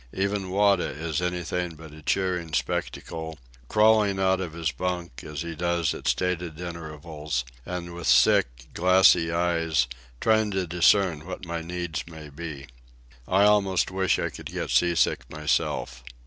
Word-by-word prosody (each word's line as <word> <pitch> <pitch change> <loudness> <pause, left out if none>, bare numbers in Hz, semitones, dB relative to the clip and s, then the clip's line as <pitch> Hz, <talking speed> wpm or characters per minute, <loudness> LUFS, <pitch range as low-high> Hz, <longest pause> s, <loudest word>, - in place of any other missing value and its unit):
Even 100 0 -1
Wada 100 -1 +3
is 80 +3 -3
anything 90 -1 -2
but 80 -1 -12
a 75 - -12
cheering 90 -1 -1
spectacle, 80 -1 -3 0.3
crawling 105 - +4
out 95 0 +2
of 85 -4 -5
his 80 -2 -1
bunk, 90 -7 -4
as 75 -1 -5
he 85 -1 -5
does 85 0 0
at - - -7
stated 85 +4 -1
intervals, 75 -5 -5 0.2
and 85 -1 -5
with 85 0 -5
sick, - - +3
glassy 90 -2 +5
eyes 85 -5 +1 0.3
trying 110 -1 +3
to 95 -2 -1
discern 85 -1 +3
what 95 0 -6
my 85 0 -4
needs 85 -2 -4
may 80 -3 -10
be. 75 -2 -7 0.6
I 95 +2 +4
almost 100 -3 +3
wish 95 0 +1
I - - -2
could - - -8
get - - -4
sea 85 -1 +3
sick - - +1
myself. 75 -5 -1
85 Hz, 150 wpm, -26 LUFS, 80-95 Hz, 0.6 s, glassy